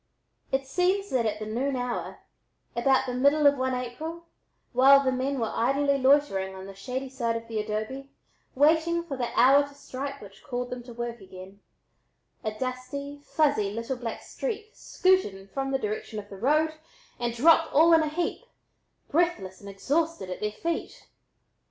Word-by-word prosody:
It 270 0 0
seems 370 +7 0
that 240 -3 +2
at 210 0 -2
the 215 - -6
noon 255 +6 -1
hour, 245 -1 -4 0.5
about 265 +2 +3
the 250 - -3
middle 285 +4 +3
of 285 0 +7
one 260 -1 -1
April, 310 +8 -5 0.5
while 275 +3 +7
the 260 - +2
men 260 +1 -1
were 225 -2 -1
idly 275 +3 +2
loitering 260 -9 +3
on 190 0 -8
the 195 - -9
shady 255 +7 -5
side 240 -3 -2
of 230 0 -5
the 225 -1 -3
adobe, 215 +6 -4 0.5
waiting 320 +4 +3
for 300 -5 -5
the 245 -2 -2
hour 270 +3 +7
to 285 0 -7
strike 275 0 -6
which 200 -3 -14
called 245 -1 -4
them 250 0 -4
to 245 - -10
work 235 -1 -5
again, 190 +1 -12 0.8
a 215 - -1
dusty, 260 +5 -5
fuzzy 290 -12 +1
little 230 +5 -3
black 235 -2 -5
streak 435 -2 -5
scooted 370 - +1
in 195 0 -13
from 270 +5 -3
the 270 - +1
direction 215 -2 -4
of 205 -1 -7
the 195 - -9
road 305 +8 +2 0.5
and 240 -1 -2
dropped 320 +5 +5
all 325 +4 +6
in 325 - +6
a 310 - 0
heap, 335 +2 -2 0.7
breathless 280 - 0
and 200 - -9
exhausted, 285 - -1
at 180 - -5
their 210 0 -1
feet. 335 +9 -4
260 Hz, 175 wpm, -27 LUFS, 230-290 Hz, 0.8 s, of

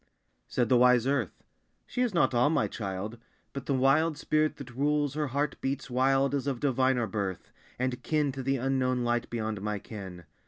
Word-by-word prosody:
Said 120 -2 0
the 125 - +4
wise 125 -1 +5
earth 135 -8 -1 0.4
"She 250 - -3
is 245 -2 +2
not 170 -7 +2
all 120 +4 +4
my 160 - +2
child. 100 +2 -5 0.3
But 140 -1 -6
the 140 - +1
wild 145 +4 +3
spirit 155 +1 +1
that 130 -3 -9
rules 145 +1 +1
her 150 0 -1
heart 140 +2 -2
beats 135 -1 -3
wild 135 +2 +2
Is 140 -1 -1
of 135 -4 -1
diviner 130 -2 +2
birth 100 -5 -4 0.3
And 125 0 -2
kin 150 -3 +1
to 135 0 -6
the 135 +1 0
unknown 130 -1 0
light 120 0 0
beyond 110 -3 -3
my 105 0 -2
ken. 95 -4 -9
130 Hz, 190 wpm, -29 LUFS, 120-140 Hz, 0.4 s, wise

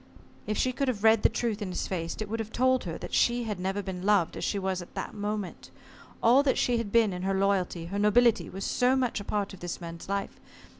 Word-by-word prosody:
If 215 - -1
she 255 - +2
could 275 +2 -2
have 225 -5 -2
read 220 -1 +6
the - - +5
truth 225 -2 -2
in 200 - -3
his 180 - -3
face, 170 -3 -3
it 215 - -3
would 225 +2 -3
have 220 0 -4
told 255 -1 +2
her 165 -2 -4
that - - -8
she 240 0 +3
had 210 -5 -4
never 195 +2 -2
been 185 -2 -5
loved 195 -3 +2
as - - -5
she 205 - 0
was 190 -1 -1
at 175 - -13
that - - -4
moment. 210 -2 -4 0.5
All 245 +4 +6
that 280 -2 +1
she 245 -1 +2
had 215 -3 -4
been 225 -3 +4
in 180 - -5
her 195 +1 0
loyalty, 190 -3 0
her 195 +4 -3
nobility, 230 +3 +4
was 195 +1 -5
so 250 +1 +2
much 250 -4 0
a - - -6
part 205 0 -2
of 190 - -11
this 175 -1 -5
man's 170 +1 -8
life. 200 0 -3
205 Hz, 255 wpm, -28 LUFS, 190-230 Hz, 0.5 s, read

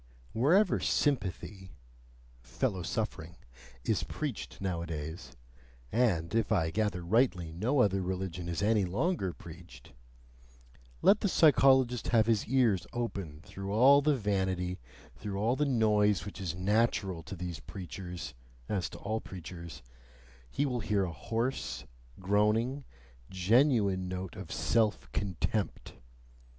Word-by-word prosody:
Wherever 175 - +4
sympathy 100 - -1 0.7
(fellow 65 +9 -2
suffering) 85 - -3 0.5
is - - +1
preached - - -5
nowadays 85 -4 -4 0.6
and, 105 -8 +1
if 115 0 +1
I 80 -6 +2
gather 100 -3 -1
rightly, 90 -4 +1
no 115 - +1
other 95 -3 +2
religion 90 -1 -3
is 85 +3 -2
any 105 -1 +3
longer 95 - 0
preached 85 +1 -13 1.1
let 205 - +6
the 205 - 0
psychologist 130 -7 +4
have 115 -3 +4
his 110 -2 +1
ears 120 -7 +2
open 100 -11 -4
through 95 0 -7
all 135 +6 +7
the 150 0 +3
vanity, 95 -5 -1 0.4
through 100 -2 -5
all 115 +5 +2
the 150 - +1
noise 105 -6 +2
which 100 0 -8
is 85 -3 -3
natural 100 -2 +1
to 80 +4 -8
these 90 -2 -5
preachers 90 -3 -7 0.3
(as 95 -4 -1
to - - -10
all 110 +2 -3
preachers), 85 -3 -9 0.7
he 145 - 0
will 125 -3 -1
hear 105 -3 +1
a 90 -3 -3
hoarse, 115 - -3 0.3
groaning, 105 +8 +1 0.4
genuine 100 -1 +3
note 95 0 -5
of 95 -3 -8
SELF 105 +7 +1
CONTEMPT. 100 +2 -2
100 Hz, 125 wpm, -31 LUFS, 90-115 Hz, 1.1 s, all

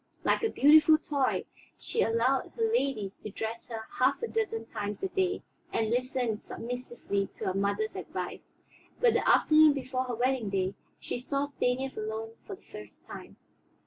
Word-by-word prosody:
Like - - +2
a 445 - +1
beautiful 310 +1 +7
toy 285 -4 0 0.3
she 460 - -2
allowed 235 +4 +1
her 460 - -1
ladies 260 - -1
to 215 - -7
dress 225 +3 -5
her 225 -2 -5 0.2
half 270 - +3
a - - 0
dozen 410 - -2
times 205 - -5
a 385 - 0
day, 375 0 0 0.3
and 220 -1 0
listened 245 -3 0
submissively 240 -4 -4
to - - -6
her 185 - 0
mother's 200 +2 0
advice. 180 0 -6 0.5
But 480 -2 +5
the - - +2
afternoon 310 -1 +6
before 260 -1 -2
her 245 -2 -3
wedding 250 -2 0
day, 190 -1 0 0.3
she - - -4
saw 275 +3 -1
Stanief 265 -1 -1
alone 220 +1 -4 0.2
for 395 - -5
the 380 - -24
first - - -12
time. - - -10
250 Hz, 170 wpm, -30 LUFS, 220-285 Hz, 0.5 s, beautiful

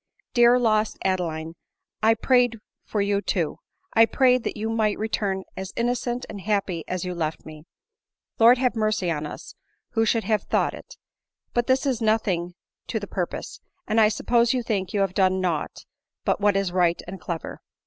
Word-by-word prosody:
Dear, 240 0 +6
lost 220 -3 +1
Adeline, 165 -4 -1 0.5
I 225 +1 +4
prayed 245 0 +3 0.3
for 210 - -2
you 200 0 +1
too! 170 -7 -1 0.3
I 225 0 +6
prayed 255 -2 +3
that - - -3
you 215 +1 -2
might 215 -2 +1
return 200 -3 -1
as 190 0 -6
innocent 240 +1 -1
and 200 - -8
happy 195 -5 -1
as 185 0 -3
you 180 - -3
left 160 -2 -3
me. 155 0 -11 0.7
Lord 235 +2 +7
have 250 -1 +1
mercy 215 -5 0
on 150 -1 -2
us! - - -9 0.4
who 225 -1 +2
should 225 0 +2
have 215 +1 +1
thought - - 0
it! - - -11 0.6
But 240 -1 +1
this 260 +2 +2
is 255 -4 0
nothing 190 -6 0 0.3
to - - -2
the - - -6
purpose, - - -4 0.3
and 220 +1 +3
I 215 - +6
suppose 235 +2 +2
you 250 - -1
think 195 -5 -2
you 205 - 0
have 195 -2 0
done 190 -1 +2
nought 175 -5 -2 0.4
but - - +1
what 205 -1 +3
is 195 -2 0
right 175 -1 +2
and 190 +1 -8
clever." 170 -2 -5
210 Hz, 180 wpm, -24 LUFS, 185-230 Hz, 0.7 s, Lord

